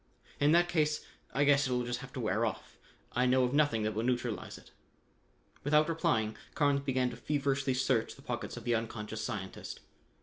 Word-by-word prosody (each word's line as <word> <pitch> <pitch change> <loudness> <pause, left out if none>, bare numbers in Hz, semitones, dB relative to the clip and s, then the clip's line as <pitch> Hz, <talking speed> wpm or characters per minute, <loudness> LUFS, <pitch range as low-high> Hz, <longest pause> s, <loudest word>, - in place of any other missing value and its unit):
"In 145 +1 +4
that 175 +1 +5
case 150 -3 +1 0.3
I 140 - +2
guess 140 0 +4
it'll 125 -1 0
just 120 0 -2
have 135 0 -9
to - - -5
wear 110 -1 0
off. 110 - -4 0.3
I 125 +1 +2
know 130 +1 +4
of 125 +1 0
nothing 145 -7 +3
that 110 0 0
will 110 - -1
neutralize 120 -2 -2
it." - - -17 0.9
Without 150 +2 +4
replying, 110 -10 +1 0.2
Carnes 145 -2 +3
began 130 -2 0
to - - -7
feverishly 135 0 0
search 130 -3 +1
the - - -16
pockets - - -4
of 120 - -7
the 120 0 +1
unconscious 110 -1 -3
scientist. 105 -5 -5
125 Hz, 190 wpm, -32 LUFS, 115-145 Hz, 0.9 s, that